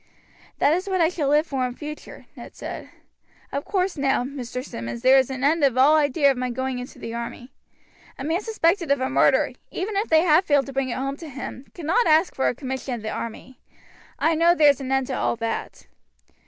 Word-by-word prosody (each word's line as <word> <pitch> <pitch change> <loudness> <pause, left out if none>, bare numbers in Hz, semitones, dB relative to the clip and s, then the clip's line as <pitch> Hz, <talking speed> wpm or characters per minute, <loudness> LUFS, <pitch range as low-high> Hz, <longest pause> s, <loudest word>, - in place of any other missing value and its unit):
"That 290 - +3
is 370 +4 -2
what 375 -1 0
I 325 -1 +4
shall 310 -6 -2
live 300 +2 +3
for 270 -5 -2
in 245 - -8
future," 300 +1 -9
Ned - - -11
said. - - -7 0.6
"Of 280 - -3
course 375 -3 -1
now, 275 -3 +1
Mr. 255 -1 -6
Simmonds, 115 - -6
there 265 +1 +7
is 265 - 0
an 265 0 -5
end 305 +2 +2
of 265 -3 +3
all 280 +4 +6
idea 290 -1 +3
of 265 - -4
my 255 0 -1
going 260 +1 -3
into 250 - -9
the 230 - -7
army. 235 +2 -6 0.7
A 265 - -6
man 325 +6 0
suspected 380 -6 0
of 280 -1 +3
a 260 0 -2
murder, - - +3 0.2
even 405 +3 -4
if 410 +3 -1
they 315 -1 +5
have 340 +2 +4
failed 285 -3 +3
to 275 - -9
bring 270 -1 -1
it - - -3
home 275 +1 -3
to 325 -1 -9
him, 270 0 -8
cannot 355 +9 +1
ask 320 +3 +4
for 265 - 0
a - - 0
commission 265 -1 -4
in 230 - -8
the 220 - -3
army. 230 +3 -7 0.6
I 325 - +2
know 335 +2 +4
there's 290 -5 +4
an 265 0 -4
end 270 -1 +2
to - - -5
all - - 0
that." 230 0 -5
280 Hz, 225 wpm, -23 LUFS, 255-320 Hz, 0.7 s, there